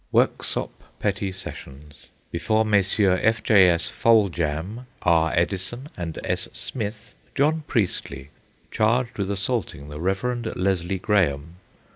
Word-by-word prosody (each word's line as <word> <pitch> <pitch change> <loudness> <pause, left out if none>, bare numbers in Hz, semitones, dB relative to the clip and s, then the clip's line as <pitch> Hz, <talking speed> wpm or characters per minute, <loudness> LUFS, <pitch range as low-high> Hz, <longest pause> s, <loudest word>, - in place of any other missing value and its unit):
Worksop - - +1 0.3
Petty 100 -1 -1
Sessions. 75 -5 -9 0.4
Before 110 +6 +1
Messrs. 100 -2 +3
F. 110 -1 +2
J. 95 -4 +6
S. 85 -1 +1
Foljambe, 100 0 +1 0.2
R. 80 -2 +3
Eddison, 95 - -1
and 85 -3 -5
S. - - -2
Smith. 105 -3 -5 0.2
John 155 +3 +2
Priestley, 75 - -2 0.4
charged 120 +2 +1
with 100 -1 -1
assaulting 100 - -2
the 75 +1 -7
Rev. 115 +6 -1
Leslie 95 0 0
Graham. 85 -5 0
95 Hz, 115 wpm, -24 LUFS, 85-110 Hz, 0.4 s, J